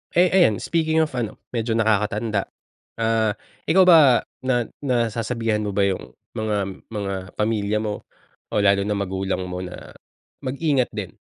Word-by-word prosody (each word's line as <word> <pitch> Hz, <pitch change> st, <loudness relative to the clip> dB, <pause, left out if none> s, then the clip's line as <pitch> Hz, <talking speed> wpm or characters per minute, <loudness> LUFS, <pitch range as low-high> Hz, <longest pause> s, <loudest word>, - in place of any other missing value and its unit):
Eh 175 Hz, +1 st, +5 dB
ayan 175 Hz, -, +5 dB
speaking 160 Hz, -1 st, +2 dB
of 155 Hz, -, -3 dB
ano, 110 Hz, -, -3 dB, 0.2 s
medyo 115 Hz, -1 st, -1 dB
nakakatanda. 105 Hz, -1 st, +1 dB, 0.5 s
Ah, 110 Hz, -2 st, +1 dB, 0.3 s
ikaw 190 Hz, +2 st, +6 dB
ba 155 Hz, -9 st, +7 dB, 0.2 s
na 125 Hz, -2 st, +2 dB, 0.2 s
nasasabihan 115 Hz, -3 st, 0 dB
mo 100 Hz, -2 st, -3 dB
ba 100 Hz, -, +3 dB
yung 95 Hz, -1 st, -2 dB, 0.2 s
mga 110 Hz, -1 st, -1 dB, 0.3 s
mga 100 Hz, -3 st, -3 dB, 0.2 s
pamilya 105 Hz, -1 st, 0 dB
mo 105 Hz, -1 st, -5 dB, 0.4 s
o -, -, -4 dB
lalo 100 Hz, 0 st, +4 dB
na 105 Hz, -, 0 dB
magulang 95 Hz, -1 st, -2 dB
mo 90 Hz, 0 st, -5 dB
na 90 Hz, -1 st, -8 dB, 0.5 s
mag-ingat 135 Hz, -1 st, 0 dB
din. -, -, -4 dB
110 Hz, 145 wpm, -23 LUFS, 100-130 Hz, 0.5 s, ba